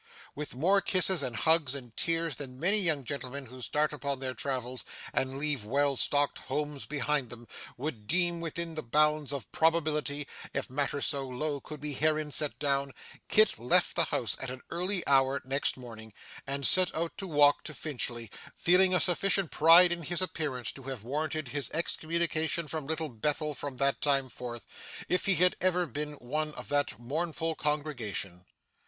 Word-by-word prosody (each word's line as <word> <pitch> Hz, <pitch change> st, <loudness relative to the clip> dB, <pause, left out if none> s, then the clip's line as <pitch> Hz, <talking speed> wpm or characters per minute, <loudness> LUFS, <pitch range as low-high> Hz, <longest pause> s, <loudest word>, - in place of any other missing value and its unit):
With 150 Hz, -3 st, -6 dB
more 190 Hz, +9 st, +3 dB
kisses, 185 Hz, -3 st, +4 dB
and 125 Hz, -4 st, -3 dB
hugs, 150 Hz, +2 st, +3 dB
and 125 Hz, -5 st, -8 dB
tears, 165 Hz, -4 st, 0 dB
than 130 Hz, -3 st, -8 dB
many 200 Hz, +7 st, +3 dB
young 160 Hz, -7 st, +1 dB
gentlemen 135 Hz, +1 st, -5 dB
who 130 Hz, +1 st, -11 dB
start 150 Hz, +7 st, 0 dB
upon 140 Hz, -2 st, -3 dB
their 130 Hz, -1 st, -3 dB
travels, 130 Hz, -2 st, -4 dB, 0.3 s
and 135 Hz, 0 st, -1 dB
leave 145 Hz, -5 st, -1 dB
well 140 Hz, +5 st, +1 dB
stocked 145 Hz, +2 st, +2 dB
homes 150 Hz, -2 st, -4 dB
behind 145 Hz, -3 st, -1 dB
them, 120 Hz, 0 st, -9 dB, 0.3 s
would 120 Hz, -6 st, -5 dB
deem 175 Hz, +3 st, +1 dB
within 165 Hz, 0 st, -3 dB
the 155 Hz, -, -4 dB
bounds 150 Hz, +2 st, +2 dB
of 140 Hz, -6 st, -5 dB
probability 150 Hz, -3 st, +1 dB, 0.3 s
(if 140 Hz, -1 st, -3 dB
matter 140 Hz, +1 st, -1 dB
so 140 Hz, -2 st, 0 dB
low 140 Hz, +3 st, -3 dB
could 150 Hz, +2 st, -9 dB
be 150 Hz, -1 st, -4 dB
herein 155 Hz, +1 st, +1 dB
set 150 Hz, 0 st, 0 dB
down), 140 Hz, -2 st, 0 dB, 0.4 s
Kit 215 Hz, -, +4 dB
left 120 Hz, +2 st, +3 dB
the -, -, +3 dB
house -, -, 0 dB
at 135 Hz, -, -4 dB
an 130 Hz, 0 st, -8 dB
early 180 Hz, +2 st, -1 dB
hour 135 Hz, 0 st, +3 dB
next 135 Hz, +1 st, 0 dB
morning, 110 Hz, -3 st, -11 dB, 0.3 s
and 140 Hz, 0 st, -1 dB
set 185 Hz, -1 st, +5 dB
out 165 Hz, +1 st, -2 dB
to 195 Hz, -, -4 dB
walk 145 Hz, -3 st, +4 dB
to 155 Hz, -, -3 dB
Finchley; 120 Hz, -7 st, -3 dB, 0.2 s
feeling 185 Hz, +1 st, +4 dB
a -, -, +4 dB
sufficient 190 Hz, +1 st, +2 dB
pride 170 Hz, +3 st, +7 dB
in 175 Hz, 0 st, -2 dB
his 170 Hz, +2 st, -2 dB
appearance 145 Hz, -9 st, -2 dB
to 135 Hz, -, -12 dB
have 130 Hz, -4 st, -7 dB
warranted 150 Hz, +2 st, -3 dB
his 145 Hz, 0 st, -2 dB
excommunication 165 Hz, -1 st, 0 dB
from 155 Hz, -2 st, -5 dB
Little 160 Hz, 0 st, -2 dB
Bethel 150 Hz, +6 st, -1 dB
from 140 Hz, -1 st, -6 dB
that 140 Hz, +1 st, +1 dB
time 140 Hz, -2 st, +2 dB
forth, 120 Hz, -1 st, -7 dB, 0.4 s
if 180 Hz, -, 0 dB
he 195 Hz, -, +5 dB
had 180 Hz, +1 st, +6 dB
ever 180 Hz, -1 st, +2 dB
been 150 Hz, +1 st, -4 dB
one 150 Hz, +3 st, -4 dB
of -, -, -7 dB
that 145 Hz, -3 st, 0 dB
mournful 160 Hz, +5 st, -2 dB
congregation. 125 Hz, -, -3 dB
145 Hz, 175 wpm, -30 LUFS, 130-160 Hz, 0.4 s, pride